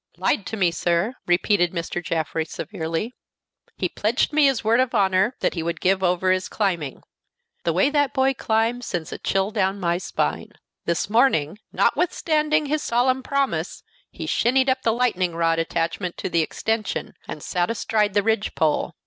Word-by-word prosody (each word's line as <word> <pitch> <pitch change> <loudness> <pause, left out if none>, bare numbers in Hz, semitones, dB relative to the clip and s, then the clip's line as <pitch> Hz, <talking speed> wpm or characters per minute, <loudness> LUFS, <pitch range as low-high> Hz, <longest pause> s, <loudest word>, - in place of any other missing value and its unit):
"Lied 195 - 0
to 220 - -4
me, 180 -4 +3
sir," 170 +6 0
repeated 175 0 +2
Mr. 170 0 -3
Jaffrey, 160 -1 -1
severely. 165 +5 -4 0.6
"He - - 0
pledged 230 +8 0
me 300 -1 +5
his 270 -3 0
word 225 +3 +3
of 255 -1 +1
honor 195 +3 +2
that - - +1
he 170 - -3
would 170 0 -3
give 190 +1 +2
over 180 0 +2
his 185 0 0
climbing. 170 -10 -2 0.6
The 165 - +2
way 190 - +3
that 285 -2 +2
boy 270 -1 +2
climbs 230 +1 0
sends 170 -4 -3
a - - -7
chill 195 +1 0
down 195 -2 0
my 175 -1 0
spine. - - -2 0.3
This 170 -1 0
morning, 210 - +2
notwithstanding 310 -3 +1
his 300 +1 -1
solemn 255 +1 +1
promise, 260 - -2 0.3
he - - -7
shinned 260 +3 +2
up 260 0 -1
the 230 - +2
lightning 200 -8 0
rod 165 -1 +1
attached 165 +2 -1 0.2
to - - -3
the 170 -2 +2
extension, 220 +7 -2
and - - -7
sat 175 -2 -1
astride 215 -2 0
the 205 - +3
ridge 220 0 0
pole. 155 -2 0
200 Hz, 175 wpm, -23 LUFS, 170-245 Hz, 0.6 s, me